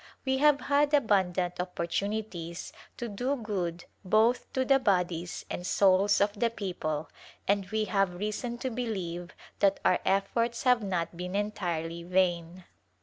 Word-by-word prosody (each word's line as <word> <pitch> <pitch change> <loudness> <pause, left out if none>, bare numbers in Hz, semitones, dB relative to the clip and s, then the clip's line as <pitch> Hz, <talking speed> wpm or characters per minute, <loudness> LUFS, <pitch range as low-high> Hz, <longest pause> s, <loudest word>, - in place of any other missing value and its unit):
We 265 0 +1
have 295 0 +5
had 290 +1 +3
abundant 185 -8 +1
opportunities 180 0 -3 0.2
to 240 - -4
do 245 +6 -1
good 185 -8 -3 0.2
both 220 +5 +2
to 260 0 +1
the 270 +1 +5
bodies 180 -6 0
and 175 - -5
souls 195 +2 +4
of 205 0 +2
the 235 - +3
people 175 -8 -3 0.4
and 200 -1 +1
we 220 0 0
have 195 -4 +1
reason 215 +5 -3
to 260 - 0
believe 185 -7 -4 0.2
that 195 -1 +3
our 180 - +4
efforts 230 +5 0
have 250 -2 +4
not 180 -4 -2
been 180 +2 -5
entirely 170 -5 -2
vain. 175 0 0
195 Hz, 145 wpm, -29 LUFS, 180-230 Hz, 0.4 s, have